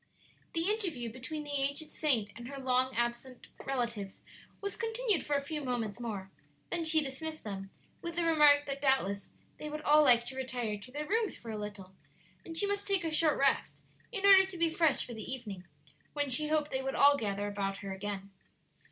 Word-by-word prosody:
The 330 +1 0
interview 330 - -3
between 300 +5 -5
the 290 - -7
aged 280 +3 -2
saint 235 -10 +1
and 235 +1 -8
her 275 +1 -7
long 260 -1 +1
absent 240 +2 -3 0.2
relatives 235 -7 -3 0.4
was 400 -1 -4
continued 450 -4 0
for 290 - 0
a 280 - 0
few 300 +1 -4
moments 240 -5 -2
more; 205 -5 -5 0.4
then 340 -1 -1
she 315 0 +4
dismissed 310 +3 -6
them, 195 -2 -6 0.3
with 340 -1 -5
the 345 - 0
remark 300 -3 +6
that 275 0 -4
doubtless 200 -8 +1 0.3
they 300 - -5
would 305 0 -5
all 300 +1 +6
like 240 -5 +5
to 260 - -6
retire 250 -4 -2
to 230 +5 -12
their 295 +3 -4
rooms 445 +2 0
for 230 - -8
a 215 - -4
little, 205 -3 -7 0.5
and 325 -1 -7
she 405 - +4
must 405 0 -1
take 390 -3 +1
a 325 - -2
short 310 -1 +3
rest 275 - +1 0.3
in 400 -4 -2
order 390 -1 +9
to 380 -2 -8
be 335 -1 +2
fresh 325 -3 +2
for 240 - -8
the 220 +3 -7
evening, 210 -8 -6 0.5
when 290 -2 0
she 300 +5 +5
hoped 305 -1 0
they 265 - -1
would 270 0 -3
all 285 0 +6
gather 205 -5 -2
about 195 -1 -2
her 195 - -4
again. 195 0 -5
270 Hz, 205 wpm, -32 LUFS, 230-315 Hz, 0.5 s, order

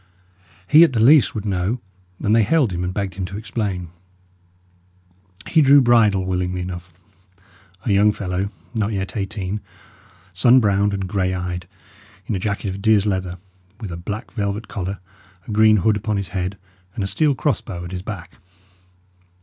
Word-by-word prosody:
He, 155 +2 +8
at 165 - +3
the 115 - 0
least, 135 +4 +5
would 105 -1 -4
know, 100 +4 -1 0.4
and 105 +2 +3
they 115 - +5
hailed 120 - +2
him 85 +1 -2
and 90 - -2
begged 95 0 -3
him 95 +1 -4
to 95 +2 -6
explain. 105 -5 -3 1.6
He 160 - +3
drew 140 0 +7
bridle 110 -7 +4
willingly 90 0 -2
enough 90 -1 -7 0.9
a 110 - +1
young 105 +2 +5
fellow 95 -1 -3 0.2
not 110 -1 -1
yet 95 -1 -4
eighteen, 100 0 -3 0.7
sun 120 +8 +5
browned 100 -2 +2
and 95 -1 -3
grey 95 -1 0
eyed, 90 -1 -4 0.6
in - - -3
a 95 - -1
jacket 100 +1 -2
of 95 +1 -6
deer's 110 -2 +3
leather, 95 -3 -2 0.4
with 105 -5 -6
a - - -4
black 105 +7 -6
velvet 105 0 -3
collar, 100 0 -4 0.5
a - - -5
green 110 0 +5
hood 105 +2 +2
upon 105 0 -2
his 100 -3 -3
head, 95 +1 -3 0.4
and 110 - -2
a - - -1
steel 145 +8 +1
cross 130 -3 0
bow 90 -5 -7
at 85 - -8
his 90 -1 -4
back. 90 -3 -8
100 Hz, 175 wpm, -21 LUFS, 90-110 Hz, 1.6 s, He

